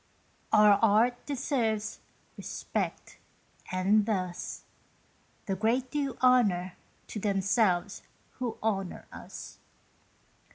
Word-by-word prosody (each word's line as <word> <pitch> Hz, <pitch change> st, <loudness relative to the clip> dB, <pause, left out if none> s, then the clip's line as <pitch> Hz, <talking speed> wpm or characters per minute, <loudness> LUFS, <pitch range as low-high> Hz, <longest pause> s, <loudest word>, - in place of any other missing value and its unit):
Our 210 Hz, -1 st, +6 dB
art 225 Hz, +3 st, +3 dB
deserves 225 Hz, -6 st, -1 dB, 0.4 s
respect, -, -, -4 dB, 0.5 s
and 200 Hz, +3 st, +3 dB
thus 185 Hz, -5 st, -3 dB, 0.8 s
The 195 Hz, -, -1 dB
great 240 Hz, +5 st, 0 dB
do 275 Hz, -4 st, -2 dB
honour 200 Hz, -8 st, +4 dB, 0.3 s
to 215 Hz, -, -6 dB
themselves 195 Hz, -1 st, +1 dB, 0.4 s
who 245 Hz, -3 st, -3 dB
honour 195 Hz, -4 st, -2 dB
us. -, -, -10 dB
215 Hz, 85 wpm, -29 LUFS, 195-240 Hz, 0.8 s, Our